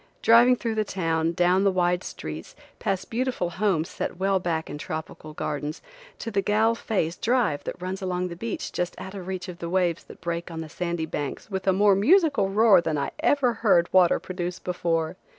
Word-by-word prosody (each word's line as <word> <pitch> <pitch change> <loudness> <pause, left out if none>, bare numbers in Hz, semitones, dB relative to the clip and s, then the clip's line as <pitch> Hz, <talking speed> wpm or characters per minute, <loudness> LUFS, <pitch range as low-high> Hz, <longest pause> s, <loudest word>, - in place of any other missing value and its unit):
Driving 240 +2 +7
through 230 -2 -3
the 215 0 +1
town, 165 -4 -1
down 180 +2 +3
the 200 - +4
wide 180 -1 +1
streets, 80 +1 -7 0.2
past 195 -1 -2
beautiful 235 -7 -1
homes 175 -3 0
set - - -5
well 195 +1 +1
back 165 -3 -2
in 150 - -7
tropical 155 0 -6
gardens, 150 0 -3 0.4
to 230 - -5
the 200 -1 +1
Galle 215 +3 +2
Face 190 -8 -1
drive 235 - +1
that - - -5
runs 185 +2 -4
along 180 -1 -2
the 170 - -7
beach 225 +5 -4
just 180 0 -3
out 190 - -7
of 190 -3 -7
reach 190 0 -4
of 180 -1 -8
the 170 - -4
waves 175 -2 +1
that - - -13
break 170 +1 -4
on 165 -1 -5
the 160 - -7
sandy 170 0 -3
banks 145 +5 -5
with 190 0 -3
a - - +6
more 200 +2 +4
musical 280 - +4
roar 210 -1 +5
than 160 -3 -1
I 140 - -2
ever 285 -6 +2
heard 180 -6 +3
water 185 -2 +5
produce 180 -1 -4
before. 170 -1 -2
185 Hz, 205 wpm, -25 LUFS, 170-205 Hz, 0.4 s, Driving